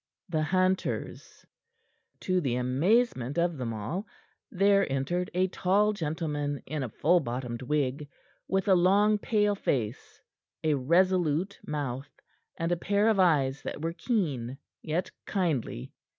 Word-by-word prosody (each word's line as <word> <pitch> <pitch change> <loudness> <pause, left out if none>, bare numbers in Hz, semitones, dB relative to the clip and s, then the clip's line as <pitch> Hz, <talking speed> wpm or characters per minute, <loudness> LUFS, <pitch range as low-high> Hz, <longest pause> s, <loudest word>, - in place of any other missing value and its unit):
THE 160 -2 0
HUNTERS 185 +4 -1 0.8
To 185 -1 +1
the 130 -6 0
amazement 135 - +1
of 170 0 +1
them 125 -3 -3
all, 115 - -4 0.4
there 200 - +3
entered 175 +7 -1
a 185 +1 +3
tall 200 +4 +2
gentleman 150 -5 -3
in 150 +1 -3
a 130 - -3
full 175 +10 +3
bottomed 120 -4 -4
wig, 145 +1 -1 0.4
with 190 0 0
a 195 - +6
long, 200 +4 +4
pale 210 -1 +2
face, 125 - -3 0.4
a 155 -1 +3
resolute 175 +4 +2
mouth, 140 -2 -3 0.5
and 165 +1 -1
a 175 - +2
pair 205 +5 +2
of 215 -3 +2
eyes 145 -7 +3
that 150 - -6
were 165 0 -1
keen, 155 - -1 0.2
yet 165 +4 -2 0.2
kindly. 160 - -2
165 Hz, 135 wpm, -28 LUFS, 135-190 Hz, 0.8 s, a